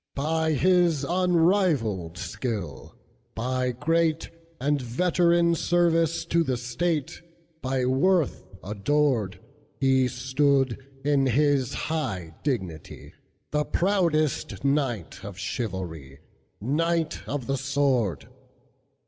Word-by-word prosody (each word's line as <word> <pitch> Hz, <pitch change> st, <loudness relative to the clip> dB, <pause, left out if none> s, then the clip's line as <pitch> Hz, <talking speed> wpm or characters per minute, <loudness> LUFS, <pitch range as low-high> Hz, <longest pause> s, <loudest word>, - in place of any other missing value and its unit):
By 160 Hz, +2 st, 0 dB
his 175 Hz, -2 st, +3 dB
unrivalled 165 Hz, -, +1 dB
skill, 105 Hz, -, -5 dB, 0.4 s
by 125 Hz, +2 st, -1 dB
greatAnd 160 Hz, 0 st, -1 dB
veteran 170 Hz, +6 st, +2 dB
service 165 Hz, -1 st, +2 dB
to 170 Hz, 0 st, +2 dB
the 130 Hz, -5 st, -1 dB
state, 145 Hz, +5 st, -2 dB, 0.4 s
By 130 Hz, -1 st, 0 dB
worth 145 Hz, +5 st, +2 dB, 0.2 s
adored, 110 Hz, +1 st, 0 dB, 0.4 s
He 130 Hz, -1 st, +3 dB
stood, 130 Hz, 0 st, +1 dB, 0.3 s
in 140 Hz, -2 st, +3 dB
his 140 Hz, 0 st, +2 dB
high 95 Hz, -, -3 dB
dignity, 95 Hz, -, -4 dB, 0.4 s
The 150 Hz, 0 st, +1 dB
proudest 170 Hz, -7 st, 0 dB
knight 135 Hz, -, -1 dB
of -, -, -8 dB
chivalry, 85 Hz, -, -5 dB, 0.4 s
Knight 165 Hz, +7 st, 0 dB
of 140 Hz, -3 st, -3 dB
the 135 Hz, +2 st, -1 dB
Sword. 130 Hz, -, 0 dB
140 Hz, 90 wpm, -26 LUFS, 120-165 Hz, 0.4 s, his